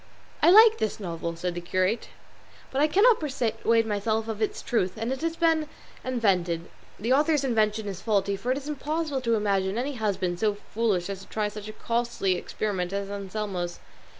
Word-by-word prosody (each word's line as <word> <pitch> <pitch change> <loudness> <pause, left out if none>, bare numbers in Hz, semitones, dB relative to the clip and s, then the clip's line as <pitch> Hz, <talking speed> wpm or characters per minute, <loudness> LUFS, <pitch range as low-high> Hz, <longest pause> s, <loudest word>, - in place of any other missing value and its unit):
"I - - +6
like 440 +4 +8
this 215 - -1
novel," 170 -3 -4
said 175 +1 -3
the 175 - -5
curate; 185 +5 0 0.6
"but 270 - 0
I 300 - +5
cannot 415 +9 +5
persuade 230 -5 +1
myself 220 +1 -1
of 220 -1 -4
its 215 - -1
truth; 205 -8 0
and 230 +3 -2
if 265 - -2
it - - -12
has 330 0 0
been 325 -2 +2 0.3
invented, 185 -9 0 0.3
the 230 +5 +1
author's 295 +1 +3
invention 220 -4 +1
is 190 -2 -5
faulty, 200 -3 +1
for 245 +6 -2
it 260 - +1
is 280 0 -7
impossible 300 0 -2
to 230 -2 +2
imagine 200 -1 0
any 270 +4 -1
husband 195 -7 -1
so 210 0 +1
foolish 205 -4 -1
as 200 -1 -5
to 195 - -13
try 210 -1 -1
such 210 0 -8
a 215 - -7
costly 235 -5 0
experiment 185 -1 -3
as 200 0 -3
Anselmo's. 195 -3 -4
215 Hz, 190 wpm, -27 LUFS, 195-260 Hz, 0.6 s, like